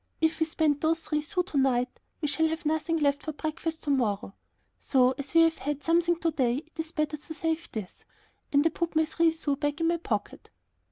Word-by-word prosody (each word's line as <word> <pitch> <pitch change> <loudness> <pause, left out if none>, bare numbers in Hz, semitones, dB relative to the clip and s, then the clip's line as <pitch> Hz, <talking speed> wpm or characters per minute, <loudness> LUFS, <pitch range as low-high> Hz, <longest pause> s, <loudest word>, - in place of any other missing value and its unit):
If 320 0 +1
we 320 - +2
spend 310 -3 +1
those 325 +1 +2
three 300 -2 -1
sous 360 +4 -1
to 295 -6 -1
night, 250 -2 +1 0.2
we 300 - 0
shall 320 +3 +2
have 320 +1 -4
nothing 315 +2 +1
left 285 -2 +2
for 310 - -5
breakfast 315 +2 -4
to 290 - 0
morrow. 210 -7 0 0.5
So, 255 -2 +3
as 280 +3 -7
we 330 - +8
have 330 0 +3
had 290 0 -3
something 345 +1 +3
to 330 - +2
day, 250 -5 +1
it 325 +1 -26
is 320 0 -3
better 305 -1 -1
to 300 +2 -9
save 325 +1 -2
this." 210 -6 -7 0.5
And 285 +1 +4
I 325 - +4
put 335 +1 -3
my 315 0 +4
three 330 +1 +2
sous 310 -3 -2
back 290 +1 -1
in 330 0 +2
my 340 - +2
pocket. 215 -11 -4
315 Hz, 225 wpm, -28 LUFS, 285-325 Hz, 0.5 s, we